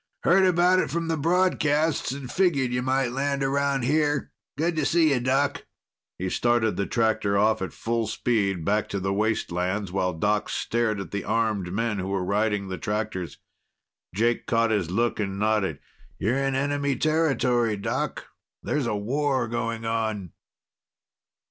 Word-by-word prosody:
"Heard 190 +2 +5
about 180 +1 +4
it - - 0
from 165 +3 -2
the 165 - +1
broadcasts 160 -3 +1
and 135 -2 -6
figured 150 -10 +2
you 125 - 0
might 130 -1 0
land 140 +1 -1
around 140 -1 +1
here. 150 +2 +1 0.3
Good 165 +2 0
to 155 - +1
see 155 +1 +3
you, 130 - +1
Doc." 135 +3 0 0.5
He 95 - -3
started 120 +2 +1
the 100 - -1
tractor 110 -3 +1
off 110 +1 +2
at 95 - -3
full 115 -1 -2
speed, 100 -7 0
back 105 +1 +1
to 100 - -2
the 95 +1 -1
wastelands, 100 -2 -1
while 90 -1 0
Doc 105 +5 0
stared 115 -3 -1
at 95 - -7
the 100 -1 -3
armed 110 -6 0
men 110 +1 -1
who 95 - -3
were 95 -2 -1
riding 105 0 0
the 95 -1 -5
tractors. 105 -4 -3 0.8
Jake 115 +3 +1
caught 115 -1 +2
his 100 -7 0
look 115 +6 0
and 100 -2 -2
nodded. 105 -6 +1 0.4
"You're 120 +7 0
in 135 -1 0
enemy 140 0 0
territory, 125 -7 +1
Doc. 100 - -3 0.4
There's 145 -5 -1
a 110 - 0
war 130 +4 0
going 115 0 -3
on!" 110 -5 -2
115 Hz, 160 wpm, -25 LUFS, 105-140 Hz, 0.8 s, Heard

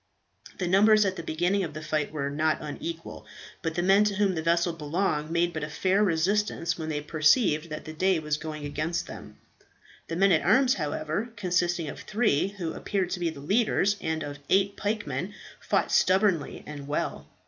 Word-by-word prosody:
The 180 - -2
numbers 210 +3 +5
at 190 -1 0
the 170 - -5
beginning 175 +5 0
of 155 -4 -5
the 155 - -5
fight 155 -1 -1
were 140 -2 -3
not 155 +2 +1
unequal, 165 +2 -7 0.3
but 165 -1 -3
the 175 - 0
men 195 +3 +5
to 205 -1 0
whom 200 -1 +2
the 160 - -2
vessel 170 +1 +2
belonged 155 0 -1
made 170 +1 +1
but 155 - -4
a 150 - -4
faint 190 +6 +1
resistance 190 0 +1
when 160 -1 -5
they 150 -1 -2
perceived 155 - +2
that 155 - -6
the 155 - -7
day 185 +3 +2
was 150 -1 -1
going 155 -1 -6
against 155 +4 -2
them. - - -10 0.7
The 165 - -4
men 195 +2 +4
at 160 - +4
arms, 255 +7 +4
however, 155 +7 -3
consisting 175 -4 0
of 140 - -7
three, 210 -8 +1
who 190 -5 -5
appeared 190 -3 -2
to 180 - -2
be 170 -1 0
the 150 -3 -9
leaders, 205 +3 +2
and 160 0 -2
of 145 -1 -7
eight 195 +1 +3
pikemen, 210 +1 -3 0.2
fought - - 0
stubbornly 190 -5 +2
and 145 -2 -8
well. 145 - -3
170 Hz, 190 wpm, -27 LUFS, 155-195 Hz, 0.7 s, numbers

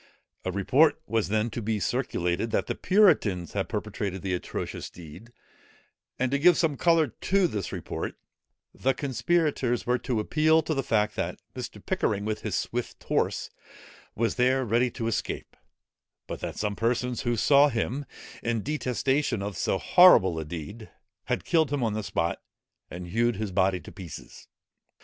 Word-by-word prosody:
A 95 - -2
report 130 - +3
was 115 -2 0
then 110 +3 0
to 120 - -4
be 110 0 -1
circulated, 105 -3 -1
that - - 0
the - - -2
puritans 150 - +3
had - - -2
perpetrated 95 -2 -4
the 95 -1 -1
atrocious 90 - -4
deed; 90 +8 -12 0.9
and 130 0 0
to 140 - +1
give 175 +3 +6
some 160 -4 +1
colour 165 +1 +4
to 190 - +1
this 105 - -2
report, - - -5 0.6
the 135 0 0
conspirators 140 -2 0
were 125 0 +1
to 125 -4 -1
appeal 155 +7 +3
to 160 - -1
the 135 - 0
fact, 105 -3 +1
that - - -3 0.2
Mr. - - -7
Pickering, 100 0 0
with 110 0 -2
his - - -2
swift - - -3
horse, - - -1 0.6
was 115 +1 0
there 130 +1 +3
ready 120 +3 +2
to 115 - -5
escape; 115 - -3 0.7
but - - -6
that - - -5
some 105 -1 -1
persons 120 +2 0
who 120 0 0
saw 140 +5 +5
him, 130 +3 -2 0.3
in 115 -3 -1
detestation 130 -4 0
of 100 -1 -4
so 90 - 0
horrible 95 - +6
a 80 - -4
deed, 90 +8 -7 0.4
had - - -2
killed 160 -5 +2
him 145 -3 0
on 110 -2 0
the 110 - -2
spot, 100 - -2 0.5
and 90 0 -7
hewed 120 +4 +1
his 105 0 -3
body 95 0 +2
to - - -12
pieces. 90 -7 -10
115 Hz, 165 wpm, -27 LUFS, 100-140 Hz, 0.9 s, give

